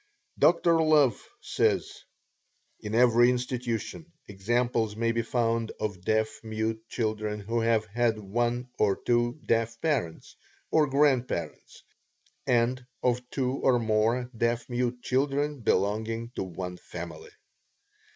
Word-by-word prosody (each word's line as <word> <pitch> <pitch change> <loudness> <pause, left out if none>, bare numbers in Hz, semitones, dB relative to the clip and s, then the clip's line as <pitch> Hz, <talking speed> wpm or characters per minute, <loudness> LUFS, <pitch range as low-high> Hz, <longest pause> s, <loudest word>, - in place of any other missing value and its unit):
Dr. 170 -1 +4
Love 150 -8 +4 0.2
says: - - 0 0.8
"In 105 +1 -4
every 120 0 +5
institution, 125 - -3 0.2
examples 110 +2 0
may 115 +1 +1
be 115 0 0
found 115 -1 -1
of 100 -4 -3
deaf 110 +3 0
mute 110 0 -2
children 110 -2 -2
who 115 +3 -2
have 115 -1 +2
had 115 +1 0
one 120 +4 -2
or 100 -2 +3
two 120 +3 0
deaf 115 0 0
parents 135 - -2 0.4
or 155 -2 +4
grandparents, 130 - 0 0.6
and 125 +1 +2 0.2
of 125 0 0
two 130 -1 -1
or 130 -3 +3
more 115 +2 +1
deaf 115 +1 0
mute 125 0 -1
children 140 +2 0
belonging 110 +3 0
to - - -5
one 90 0 -6
family." 85 -3 -9
115 Hz, 120 wpm, -28 LUFS, 110-125 Hz, 0.8 s, every